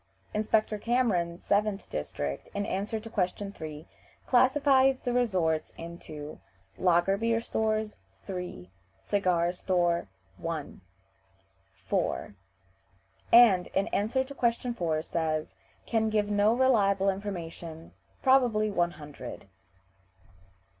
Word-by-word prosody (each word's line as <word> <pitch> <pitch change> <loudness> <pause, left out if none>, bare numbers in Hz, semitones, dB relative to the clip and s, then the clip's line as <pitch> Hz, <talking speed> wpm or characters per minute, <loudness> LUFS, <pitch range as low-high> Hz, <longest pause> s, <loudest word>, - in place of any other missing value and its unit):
Inspector 215 0 +1
Cameron, 205 -9 +1
7th 205 +1 0
district, 70 -1 -4
in 200 0 -1
answer 205 +4 -2
to 220 - -10
question 200 -1 -2
3, 155 -4 -8 0.4
classifies 265 +1 +4
the 245 - -1
resorts 185 -10 +1
into 155 -3 -8 0.4
Lager 180 +2 +3
beer 230 +1 +1
stores 220 -1 -1 0.3
3 180 - -6 0.3
Cigar 175 - +1
store 175 - 0 0.3
1 160 - -5 1.0
4 - - -1 1.0
and, 220 -7 +7
in 195 - 0
answer 225 +6 +1
to 275 +2 -10
question 240 -1 0
4, 160 -7 -1
says: 155 -2 -2 0.3
"Can 220 -1 +1
give 210 -1 0
no 205 +1 +4
reliable 200 -7 +3
information; 170 -4 -7 0.3
probably 240 -5 +4
one 175 -3 +1
hundred." 145 -9 -9
200 Hz, 105 wpm, -29 LUFS, 170-225 Hz, 1.0 s, and